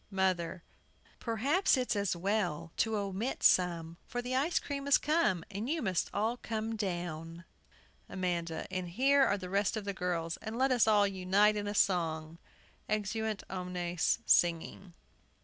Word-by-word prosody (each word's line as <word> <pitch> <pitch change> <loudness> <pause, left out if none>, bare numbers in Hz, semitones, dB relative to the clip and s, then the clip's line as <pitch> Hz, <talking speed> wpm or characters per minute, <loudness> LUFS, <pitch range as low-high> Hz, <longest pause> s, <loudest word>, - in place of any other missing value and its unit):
MOTHER. 185 -3 -1 0.6
Perhaps 270 - +2
it's 250 -3 0
as 200 -3 0
well 175 -4 -1
to 220 -1 +1
omit 200 +5 -3
some, 170 -2 +3
for 245 - -4
the 245 +1 -3
ice 295 +6 +1
cream 280 -1 -3
has 280 - +5
come, 300 - +1
and 205 +5 -4
you 325 +2 0
must 185 -3 0
all 225 +4 0
come 225 -1 -3
down. 170 -4 -4 0.6
AMANDA. 170 -3 -2
And 185 -2 -3
here 270 +9 +3
are 205 - +2
the 185 -2 -7
rest 200 +3 0
of 210 - -5
the 200 - -2
girls; 170 -3 -2
and 220 +2 -6
let 265 +1 +2
us 245 -3 +4
all 210 -2 +5
unite 195 +2 +2
in 205 -1 -3
a 205 - -3
song! 165 -4 0 0.5
[Exeunt 215 0 -2
omnes, 180 -2 -1
singing. 170 +1 +1
195 Hz, 155 wpm, -32 LUFS, 175-225 Hz, 0.6 s, has